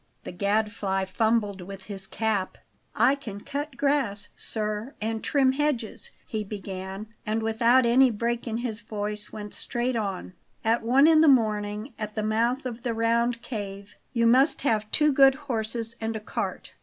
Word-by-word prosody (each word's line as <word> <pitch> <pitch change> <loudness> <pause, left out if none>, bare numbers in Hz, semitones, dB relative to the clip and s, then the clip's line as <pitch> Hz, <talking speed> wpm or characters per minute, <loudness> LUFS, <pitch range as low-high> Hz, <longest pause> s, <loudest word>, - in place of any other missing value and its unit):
The - - -6
Gadfly 200 0 0
fumbled 210 -1 0
with 195 +1 -9
his 195 -2 -6
cap. 215 -4 -1 0.4
"I 270 - +5
can 215 -8 -7
cut 285 +1 -5
grass, 250 -7 0
sir, 215 +3 -3
and 220 +1 -3
trim 270 -3 +3
hedges" 265 -5 -2 0.2
he 215 -1 -3
began; 195 0 -6
and 220 +1 -1
without 235 +3 +4
any 255 +3 +6
break 235 +2 -2
in 225 -1 -1
his 220 -3 -3
voice, 210 -1 -5
went 210 -1 -7
straight 245 +1 -2
on: 195 -4 -3 0.3
"At 230 +1 +3
one 255 +5 +5
in 315 -1 +6
the 320 - +6
morning 215 -2 +2
at 215 -1 -5
the 215 - -1
mouth 235 +5 +1
of 240 -2 -5
the 235 -1 -2
round 235 +1 +1
cave. 200 -3 -6 0.2
You 235 -2 +1
must 260 +6 +4
have 215 -5 +1
two 300 -1 +3
good 270 0 +6
horses 230 -4 -3
and 225 0 -2
a - - -2
cart. 215 - -4
225 Hz, 170 wpm, -26 LUFS, 210-245 Hz, 0.4 s, any